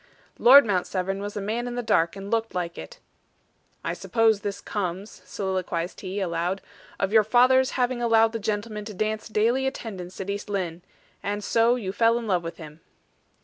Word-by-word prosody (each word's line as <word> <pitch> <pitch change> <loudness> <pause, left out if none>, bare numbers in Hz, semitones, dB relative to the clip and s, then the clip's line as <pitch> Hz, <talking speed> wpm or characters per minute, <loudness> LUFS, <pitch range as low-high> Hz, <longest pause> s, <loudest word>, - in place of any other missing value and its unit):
Lord 275 +3 +9
Mount 185 -4 0
Severn 195 +1 -2
was 205 +1 -5
a - - -2
man 225 +5 -2
in 240 - -4
the 245 - -2
dark, 170 -5 +2
and 195 0 -8
looked 225 -3 -1
like 175 -1 -2
it. - - -9 0.9
"I - - -2
suppose 225 -3 +2
this 200 -1 -4
comes," 195 -1 -5
soliloquized 185 -2 -3
he, 190 +1 -4
aloud, 175 +1 -1 0.4
"of 195 +1 -1
your 220 -1 +6
father's 255 +4 +4
having 250 -1 0
allowed 225 -1 +4
the 230 - -4
gentleman 210 0 -3
to 210 -2 -8
dance 215 +2 -2
daily 230 +5 +1
attendance 190 -9 -6
at 195 +1 -3
East 200 +1 -5
Lynne. 180 -4 -3 0.4
And 205 +1 -3
so 230 +3 +3
you 205 -7 -4
fell 230 +3 +3
in 235 - -4
love 180 -5 +1
with 165 0 -6
him." 155 -1 -11
205 Hz, 190 wpm, -25 LUFS, 185-230 Hz, 0.9 s, Lord